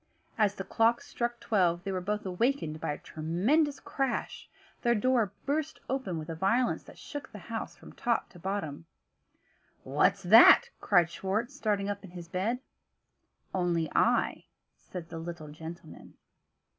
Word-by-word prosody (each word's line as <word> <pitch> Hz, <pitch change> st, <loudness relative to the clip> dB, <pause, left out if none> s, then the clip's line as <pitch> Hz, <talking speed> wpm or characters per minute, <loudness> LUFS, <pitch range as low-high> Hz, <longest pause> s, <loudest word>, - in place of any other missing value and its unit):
As 210 Hz, -2 st, +2 dB
the 195 Hz, -, -4 dB
clock 225 Hz, +4 st, +2 dB
struck 240 Hz, 0 st, -3 dB
twelve, 175 Hz, -5 st, +1 dB
they 195 Hz, -, -3 dB
were 185 Hz, -1 st, -2 dB
both 210 Hz, +3 st, -2 dB
awakened 185 Hz, -, 0 dB
by -, -, -1 dB
a -, -, -6 dB
tremendous 220 Hz, -, 0 dB
crash. 270 Hz, -2 st, -3 dB, 0.3 s
Their 235 Hz, -1 st, +3 dB
door 230 Hz, -2 st, +2 dB
burst 305 Hz, +3 st, -1 dB
open 260 Hz, -11 st, -2 dB
with 155 Hz, -1 st, -6 dB
a 165 Hz, -, -4 dB
violence 215 Hz, +9 st, +1 dB
that -, -, -14 dB
shook 285 Hz, -2 st, -8 dB
the -, -, -9 dB, 0.2 s
house 225 Hz, -, -4 dB
from -, -, -14 dB
top 235 Hz, -2 st, 0 dB
to 180 Hz, -, -15 dB
bottom. 165 Hz, -5 st, -4 dB, 1.0 s
"What's -, -, +2 dB
that?" 485 Hz, -, +8 dB
cried 175 Hz, -4 st, +3 dB
Schwartz, 215 Hz, +10 st, -2 dB
starting 205 Hz, -6 st, 0 dB
up 205 Hz, 0 st, -3 dB
in 195 Hz, -, -10 dB
his 175 Hz, -1 st, -9 dB
bed. 210 Hz, +9 st, -1 dB, 0.9 s
"Only 175 Hz, -4 st, 0 dB
I," -, -, +2 dB, 0.3 s
said 175 Hz, -2 st, -9 dB
the 165 Hz, -, -6 dB
little 165 Hz, -2 st, -7 dB
gentleman. 160 Hz, +1 st, -10 dB
195 Hz, 155 wpm, -30 LUFS, 170-235 Hz, 1.0 s, that